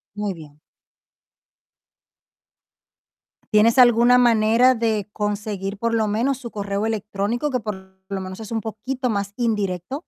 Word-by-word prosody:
Muy 205 -2 -3
bien. 150 -2 -14 2.9
¿Tienes 225 +4 +4
alguna 240 0 +6
manera 235 +1 +4
de 220 -3 -1
conseguir 205 -1 -3
por 230 +2 -1
lo 220 -1 +1
menos 235 +6 0
su 240 -3 -9
correo 200 0 -3
electrónico, 220 +5 -2
que 255 -2 -1
por 190 -3 -8
lo 195 - -3
menos 185 +2 -7
es 220 +1 -8
un 225 - -1
poquito 250 +5 -4
más 200 -2 -2
indirecto? 210 -2 -2
215 Hz, 130 wpm, -22 LUFS, 200-235 Hz, 2.9 s, alguna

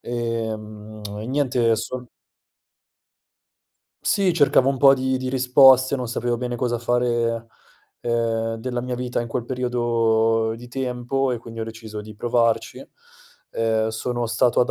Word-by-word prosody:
ehm, 110 -2 -5 0.2
e 110 - -6
niente 125 -4 +1
son 125 +3 -5 2.0
Sì, 195 -3 +2
cercavo 145 -4 +4
un 135 - 0
po' 135 +1 +7
di 130 0 -1
di 130 0 -4
risposte, 130 0 +5
non 125 -3 -3
sapevo 120 0 -1
bene 120 0 -3
cosa 120 0 -1
fare, 120 -1 0 0.5
ehm, 115 -1 -1
della 120 +1 -3
mia 125 0 -4
vita 125 0 -2
in 120 - -4
quel 120 +1 -3
periodo 115 -3 +1
di 120 - -11
tempo, 130 +1 -2
e 120 - -2
quindi 115 0 -9
ho - - -2
deciso 110 -1 -8
di 105 +1 -10
provarci. 115 0 0 0.7
Ehm, 110 -1 0
sono 120 +2 -2
stato 120 +1 +2
ad 125 - +3
120 Hz, 145 wpm, -23 LUFS, 115-125 Hz, 2.0 s, po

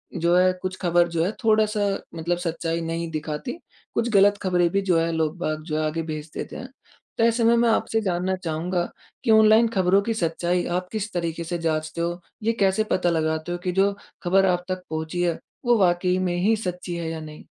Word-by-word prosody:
जो 170 +1 +2
है 185 0 +5
कुछ 185 0 -3
ख़बर 175 -1 +3
जो 165 -1 0
है 190 - 0
थोड़ा-सा 215 -2 +3 0.3
मतलब 170 +2 -1
सच्चाई 165 -1 -2
नहीं 165 0 -3
दिखाती, 155 +8 -4 0.4
कुछ 235 - 0
गलत 205 +1 +5
ख़बरें 175 -2 +2
भी 200 +1 +1
जो 180 -4 +2
है 165 0 0
लोग-बाग 155 -1 -2
जो 155 -1 -3
है 155 - 0
आगे 155 +2 -1
भेज 155 +1 -6
देते - - -6
हैं। 255 - -7 0.5
तो - - +2
ऐसे 230 +1 +3
में 230 +1 +5
मैं 235 0 +3
आपसे 225 0 +1
जानना 185 -1 0
चाहूँगा 175 +2 -1 0.4
कि 235 - +2
ऑनलाइन 220 +1 +6
ख़बरों 190 0 +3
की 225 +3 -1
सच्चाई 175 -2 0
आप 180 0 -4
किस 215 -1 -3
तरीके 170 -1 -2
से 175 +1 -3
जाँचते 155 0 -2
हो? 175 +1 -2 0.2
ये 230 +2 +2
कैसे 195 +2 +3
पता 180 -1 +2
लगाते 160 0 -1
हो 175 - -2
कि 180 - 0
जो 195 +2 +3 0.3
ख़बर 195 +2 +4
आप 180 0 +1
तक 185 0 -3
पहुँची 160 +2 -3
है 170 -2 0 0.3
वो 240 -1 +4
वाक़ई 180 0 +2
में 180 -1 0
ही 205 +6 +3
सच्ची 180 -4 -4
है 170 -1 -3
या 165 0 -4
नहीं? 155 0 -10
175 Hz, 210 wpm, -24 LUFS, 165-195 Hz, 0.5 s, ऑनलाइन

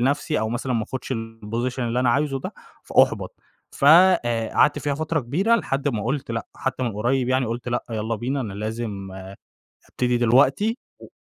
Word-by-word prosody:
لنفسي 145 +5 0
أو 110 - -1
مثلًا 125 +2 -2
ما 115 -2 0
أخدش 130 +2 -5
الposition 115 +2 -4
اللي 120 +1 0
أنا 125 -2 +3
عايزه 140 +1 0
ده، - - -6 0.3
فأحبط. - - +2 0.4
ف - - -4
آآ، 150 -10 +5
قعدت 150 - +4
فيها 145 -1 -1
فترة 160 +1 -1
كبيرة 180 - +1
لحد 140 -8 -1
ما 110 -6 -2
قُلت 135 0 -2
لأ، 115 - -3
حتّى 130 -1 -3
من 120 -3 -1
قريب 120 +4 0
يعني 130 -1 +1
قُلت 120 +2 -4
لأ، 120 0 -1
يلّا 110 0 -2
بينا 130 +5 -2
أنا 110 -6 -4
لازم 105 -2 -4 0.8
أبتدي 125 -1 0
دلوقتي 135 - +3 0.2
و - - -12
125 Hz, 180 wpm, -23 LUFS, 115-140 Hz, 0.8 s, آآ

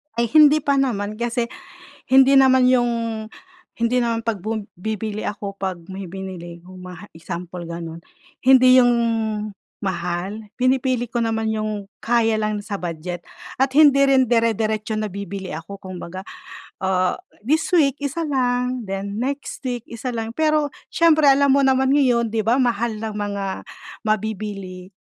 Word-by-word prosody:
Ay, 235 0 0
hindi 305 -1 +6
pa 280 -2 +2
naman. 215 -5 -1
Kasi 240 0 -1 0.6
hindi 265 +1 +6
naman 260 -1 +5
yung 240 -1 +3 0.9
hindi 235 +2 +1
naman 230 -1 -1
'pag 225 -3 -2
bum 215 +3 -3 0.2
bibili 215 +1 -3
ako 200 -1 -5
'pag 185 -3 -4
may 190 0 -6
binili 175 -2 -8
kung 185 +1 -12
maha 180 +2 -10
example, 175 +1 -7
gano'n. 170 -1 -6 0.4
Hindi 255 0 +6
yung 245 -1 +5 0.9
mahal. 185 +3 -3
Pinipili 255 -1 +1
ko 240 - -1
naman 225 -1 0
yung 215 -2 -3 0.2
kaya 225 -2 +2
lang 215 0 -1
sa 200 -2 -5
budget 175 0 -5 0.4
at 265 +1 +3
hindi 285 -2 +6
rin 265 -1 +5
dere-deretso 220 -2 0
na 215 -2 -3
bibili 200 -1 -6
ako 165 +6 -7
kumbaga. 185 -1 -8 0.6
Ah, 185 -1 +1 0.3
this 315 +6 +1
week 290 -6 +4
isa 285 +4 -2
lang, 250 -2 0
then 195 +1 -4
next 280 +2 -4
week, 245 -2 -3
isa 235 +2 -5
lang. 225 0 -4
Pero 305 -1 +2 0.2
siyempre 315 -2 +4
alam 280 +1 +3
mo 280 - +3
naman 265 +1 +3
ngayon, 245 -5 +3
di 220 0 -1
ba 240 +4 +3
mahal 235 -2 0
ng 220 -1 -5
mga 205 -1 -3 0.6
mabibili. 200 -3 -3
220 Hz, 150 wpm, -21 LUFS, 195-255 Hz, 0.9 s, hindi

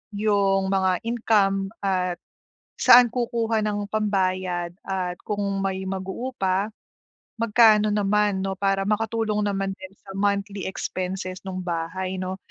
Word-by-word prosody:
yung 200 -2 +2
mga 190 -2 +1
income 205 -4 +2 0.2
at 185 -2 0 0.7
saan 245 0 +8
kukuha 230 -2 0
ng 205 -1 -1
pambayad 185 -4 0 0.2
at 185 -2 -2
kung 205 -1 -1 0.2
may 190 0 -2
mag-uupa, 195 +1 -2 0.7
magkano 215 -1 +5
naman 205 -1 +1
'no, 195 - -1
para 195 -1 +1
makatulong 215 0 0
naman 195 -1 -1
din 190 -1 -11
sa 195 - -9
monthly 200 -1 -1
expenses 185 0 -4
nung 185 0 -4
bahay 175 +2 -3
'no? 185 0 -3
195 Hz, 120 wpm, -24 LUFS, 190-210 Hz, 0.7 s, saan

